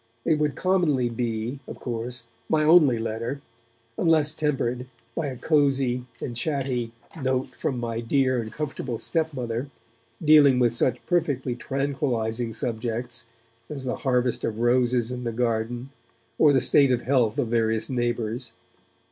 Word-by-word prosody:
It 155 -2 +2
would 150 -2 0
commonly 165 -10 +2
be, 115 +2 -3
of - - -8
course, 120 0 -4 0.3
my 155 -1 +3
only 150 -6 +6
letter, 115 +4 -3 0.6
unless 155 -3 +4
tempered 130 -5 -1 0.3
by 160 - -1
a 130 -2 -5
cosy 135 -4 +1
and 120 - -5
chatty 125 -3 -2 0.3
note 130 0 0
from 130 -4 -3
my 115 -1 -3
dear 130 +1 +1
and 110 -1 -7
comfortable 135 -5 -4
stepmother, 135 -5 -2 0.5
dealing 150 -5 +6
with 120 -2 +3
such 125 +1 0
perfectly 145 -8 0
tranquillizing 125 -4 -1
subjects 120 +1 -3 0.4
as 140 -3 -4
the 125 - -2
harvest 125 -3 0
of 110 - -2
roses 120 0 +2
in 125 0 -5
the 120 - -2
garden 120 +2 -2 0.5
or 150 - +6
the 135 - +4
state 140 -3 +5
of 125 - 0
health 125 -4 +2
of 115 - 0
various 115 -1 +1
neighbours. 120 -1 -2
125 Hz, 140 wpm, -25 LUFS, 120-140 Hz, 0.6 s, only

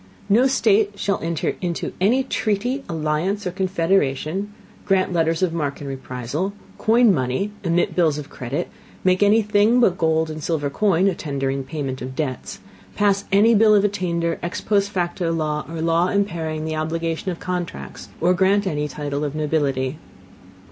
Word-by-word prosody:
No 235 +6 +5
State 210 -5 +2
shall 200 0 0
enter 165 -1 -2
into 175 -2 -3
any 240 +8 +3
Treaty, 245 +2 -1
Alliance, 165 +5 -1
or 180 - -1
Confederation; 185 -1 0 0.3
grant 190 -2 +1
Letters 165 +1 +1
of 175 -3 +1
Marque 145 -4 -2
and 145 - -7
Reprisal; 135 +7 -4 0.3
coin 230 -1 +5
Money; 130 +8 -1
emit 175 -1 +1
Bills 160 -5 +2
of 150 - -6
Credit; 135 +8 -4 0.4
make 185 +1 +3
any 210 +2 +5
Thing 210 +3 +3
but 190 -7 +3
gold 160 -1 +1
and 155 -1 -7
silver 145 -4 -1
Coin 195 +1 +2
a 195 - +2
Tender 140 -4 -2
in 135 0 -3
Payment 135 -3 -4
of 130 +1 -6
Debts; 135 -4 -4 0.3
pass 200 -1 +2
any 210 +4 +5
Bill 215 0 +6
of 200 - +4
Attainder, 170 -5 -1
ex 175 - -3
post 200 -1 +1
facto 175 -2 -1
Law, 155 -2 -1
or 165 -1 -5
Law 165 +2 +2
impairing 165 -6 -1
the 160 0 -2
Obligation 165 +3 -2
of 175 - -4
Contracts, 180 -2 -5
or 175 +2 +3
grant 195 +3 +2
any 150 -5 -1
Title 145 -1 -4
of 145 0 -3
Nobility. 145 -2 -1
170 Hz, 170 wpm, -22 LUFS, 155-200 Hz, 0.4 s, Bill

